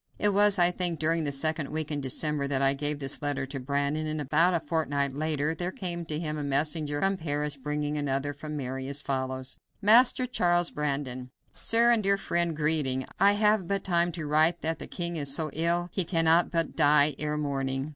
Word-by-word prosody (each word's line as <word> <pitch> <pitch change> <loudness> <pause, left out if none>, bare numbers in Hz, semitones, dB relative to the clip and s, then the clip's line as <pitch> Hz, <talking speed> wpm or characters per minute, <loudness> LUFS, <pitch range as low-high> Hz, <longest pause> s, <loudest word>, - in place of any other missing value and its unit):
It 210 - +4
was, 205 0 +4
I 175 0 +4
think, 175 -2 -2
during 160 +1 0
the 145 - -1
second 155 +1 0
week 155 0 -4
in 145 -1 -2
December 140 +2 -2
that 140 -1 -1
I 135 0 +3
gave 145 +1 -2
this 135 +1 -3
letter 145 -2 -2
to 135 0 -7
Brandon, 140 +3 -2
and 155 0 -3
about 155 +5 +2
a - - +1
fortnight 145 -4 -2
later 155 +1 -1
there 175 +2 -3
came 175 -3 -4
to 150 -1 -4
him 155 -2 -4
a - - -4
messenger 145 +1 0
from 195 0 +1
Paris, 150 -3 -3
bringing 150 +2 -3
another 145 0 -2
from 150 +1 -7
Mary, 130 -1 -5
as 140 +1 -4
follows: 130 -1 -3 0.2
"Master 240 +5 +5
Charles 175 -7 +1
Brandon: 135 -4 -3 0.2
"Sir 235 +1 +4
and 230 -2 +4
Dear 200 0 +2
Friend, 170 -4 0
Greeting 150 -4 0
I 200 +1 +5
have 210 -3 +1
but 200 0 -2
time 175 -2 +1
to 165 -2 -5
write 155 +3 +2
that 160 +1 -2
the - - -8
king 170 -1 -3
is 140 -2 +1
so 155 -1 -2
ill 170 +2 0
he 190 - +1
cannot 165 0 +3
but 165 -2 -2
die 150 -1 +4
ere 150 0 -2
morning. 135 -1 -2
150 Hz, 205 wpm, -27 LUFS, 140-170 Hz, 0.2 s, Master